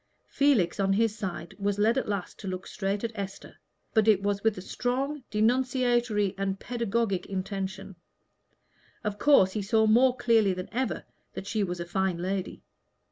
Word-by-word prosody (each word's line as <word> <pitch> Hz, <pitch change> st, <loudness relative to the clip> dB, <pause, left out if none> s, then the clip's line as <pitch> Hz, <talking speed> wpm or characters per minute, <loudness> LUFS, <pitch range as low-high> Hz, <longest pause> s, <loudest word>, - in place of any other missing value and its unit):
Felix 255 Hz, -12 st, +2 dB
on 195 Hz, 0 st, +2 dB
his 220 Hz, +1 st, +2 dB
side, 185 Hz, -5 st, -5 dB
was 200 Hz, 0 st, 0 dB
led 215 Hz, +3 st, +3 dB
at 265 Hz, -, -1 dB
last 200 Hz, -3 st, -4 dB
to 200 Hz, -, -7 dB
look 185 Hz, 0 st, -4 dB
straight 200 Hz, +1 st, -3 dB
at 230 Hz, -, -1 dB
Esther, 200 Hz, -2 st, -7 dB, 0.4 s
but 220 Hz, -2 st, +3 dB
it 200 Hz, -3 st, +4 dB
was 200 Hz, 0 st, -1 dB
with 220 Hz, -2 st, +2 dB
a -, -, -5 dB
strong 265 Hz, +6 st, -2 dB
denunciatory 240 Hz, -2 st, +1 dB
and 195 Hz, 0 st, -1 dB
pedagogic 230 Hz, -5 st, -1 dB
intention. 195 Hz, 0 st, -4 dB, 1.1 s
Of 210 Hz, -1 st, -3 dB
course 275 Hz, -11 st, +5 dB
he 210 Hz, -, -2 dB
saw 220 Hz, +2 st, +2 dB
more 245 Hz, +4 st, +4 dB
clearly 225 Hz, -5 st, +3 dB
than 185 Hz, +1 st, -6 dB
ever 260 Hz, +2 st, -2 dB, 0.3 s
that -, -, -6 dB
she 210 Hz, +1 st, -1 dB
was 175 Hz, -2 st, -3 dB
a 170 Hz, -, -3 dB
fine 190 Hz, 0 st, 0 dB
lady. 185 Hz, +2 st, -3 dB
205 Hz, 170 wpm, -28 LUFS, 195-235 Hz, 1.1 s, course